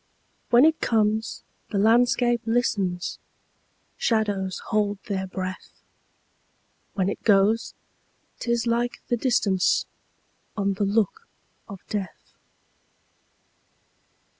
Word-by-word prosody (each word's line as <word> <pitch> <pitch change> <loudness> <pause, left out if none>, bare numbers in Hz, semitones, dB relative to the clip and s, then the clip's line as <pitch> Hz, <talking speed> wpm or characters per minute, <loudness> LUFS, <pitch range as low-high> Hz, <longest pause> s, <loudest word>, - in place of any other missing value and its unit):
When 240 +4 +6
it 315 0 +2
comes, 220 0 0 0.3
the 205 - -2
landscape 240 +2 +3
listens, 200 -6 0 0.8
Shadows 205 -5 0 0.2
hold 205 -1 +1
their 190 -2 -3
breath; 185 0 -7 1.1
When 190 -2 +1
it 200 - -3
goes, 210 +2 +3 0.6
't - - -5
is 235 -1 +1
like 240 +1 -1
the 240 - +2
distanceOn 210 -6 +2 0.9
the 200 +1 -1
look 225 - 0 0.4
of 195 -3 -9
death. 200 -4 -6
215 Hz, 90 wpm, -25 LUFS, 195-235 Hz, 1.1 s, When